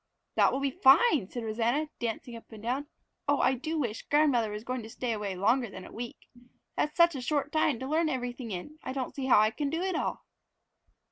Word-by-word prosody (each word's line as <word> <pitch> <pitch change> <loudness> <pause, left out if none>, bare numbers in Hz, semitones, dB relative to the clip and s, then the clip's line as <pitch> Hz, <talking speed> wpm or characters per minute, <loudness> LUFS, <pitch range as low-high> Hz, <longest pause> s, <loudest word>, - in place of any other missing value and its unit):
"That - - +4
will 270 - -1
be 275 -1 +1
fine," 275 - +5
said 240 - -5
Rosanna, 235 +7 0
dancing 235 +1 -4
up 230 - -12
and 220 -1 -11
down. 260 +5 -1 0.4
"Oh, 285 0 +3
I 265 - +4
do 315 +6 -3
wish 235 -7 -2
grandmother 285 -7 +3
was 210 +1 -6
going 250 +1 -3
to 220 - -9
stay 245 +1 -3
away 210 -3 -3
longer 230 +6 +2
than 185 - -9
a - - -11
week! 235 0 -8 0.5
That's 300 - -1
such 340 0 +6
a 270 - -4
short 290 +2 -1
time 310 -4 +2
to 260 - -4
learn 315 +2 +2
everything 245 -2 -4
in, 215 +11 -6
I 260 - -5
don't 265 -2 -3
see 270 -2 -3
how 245 - +7
I 215 +1 +4
can 285 +4 -2
do 330 +4 -2
it 375 -2 -1
all." - - -2
255 Hz, 225 wpm, -29 LUFS, 230-295 Hz, 0.5 s, how